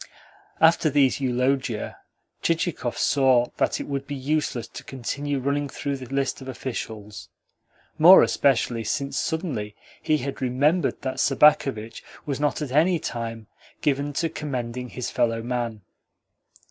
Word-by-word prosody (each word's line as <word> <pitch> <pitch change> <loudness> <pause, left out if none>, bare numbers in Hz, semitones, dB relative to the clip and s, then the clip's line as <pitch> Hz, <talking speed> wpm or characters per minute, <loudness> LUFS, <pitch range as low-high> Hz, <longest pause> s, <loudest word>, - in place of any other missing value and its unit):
After 160 0 +5
these 140 -2 +3
eulogia 130 -2 -1 0.4
Chichikov 165 -7 -1
saw 130 -3 +3
that - - +1
it - - -3
would 140 -1 -4
be 145 - -4
useless 135 -4 -1
to - - -9
continue 140 +3 -3
running 140 +2 -1
through 140 0 -3
the 130 -1 -9
list 135 0 -1
of 130 - -9
officials 110 -5 -6 0.7
more 175 +5 +9
especially 120 -4 +1
since 140 +4 -2
suddenly 140 - -3 0.3
he 155 - +2
had 140 -1 -5
remembered 145 +9 +1
that 130 -1 -3
Sobakevitch 135 -6 +3 0.2
was 140 -2 -3
not 150 +1 0
at 140 - -6
any 165 +6 +3
time 115 -6 -5 0.4
given 145 0 0
to 165 - 0
commending 125 -5 -4
his 125 0 -5
fellow 115 -2 0
man. 120 -4 -3
135 Hz, 135 wpm, -24 LUFS, 120-145 Hz, 0.7 s, more